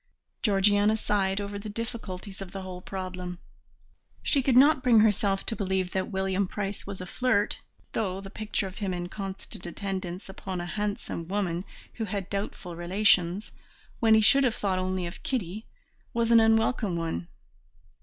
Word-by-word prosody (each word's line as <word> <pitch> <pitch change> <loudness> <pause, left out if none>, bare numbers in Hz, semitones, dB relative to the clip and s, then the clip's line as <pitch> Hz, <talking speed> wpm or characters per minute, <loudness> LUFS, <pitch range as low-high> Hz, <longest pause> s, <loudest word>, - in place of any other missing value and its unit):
Georgiana 205 +1 +4
sighed 195 -2 +1
over 200 0 -4
the 210 +1 -6
difficulties 205 -3 -5
of 190 -2 -7
the 195 -1 -5
whole 180 -1 -7
problem. 185 -2 -5 0.9
She 280 - +3
could 255 -1 +3
not 280 +1 +7
bring 235 -4 +6
herself 205 -2 +2
to 225 - -1
believe 190 -3 0
that 190 -1 -1
William 190 -1 0
Price 200 +1 -4
was 200 -2 -5
a - - -4
flirt, 220 +1 +1 0.3
though 190 -3 -1
the 195 0 -9
picture 215 -1 -2
of 190 0 -7
him 195 -3 -1
in 175 0 -4
constant 195 -2 -6
attendance 185 -1 -4
upon 190 -1 -5
a 175 - -3
handsome 205 -3 -3
woman 185 -2 -1 0.3
who 225 - -3
had 200 -2 -4
doubtful 195 -3 -4
relations, 180 +1 +2 0.5
when 220 -1 +6
he 220 - +6
should 275 +6 +6
have 245 -4 +2
thought 190 -2 0
only 185 -1 -1
of 170 +2 -7
Kitty, 215 -4 -3 0.5
was 235 0 +2
an 230 - +9
unwelcome 225 -3 +3
one. 165 - -2
195 Hz, 165 wpm, -28 LUFS, 185-215 Hz, 0.9 s, an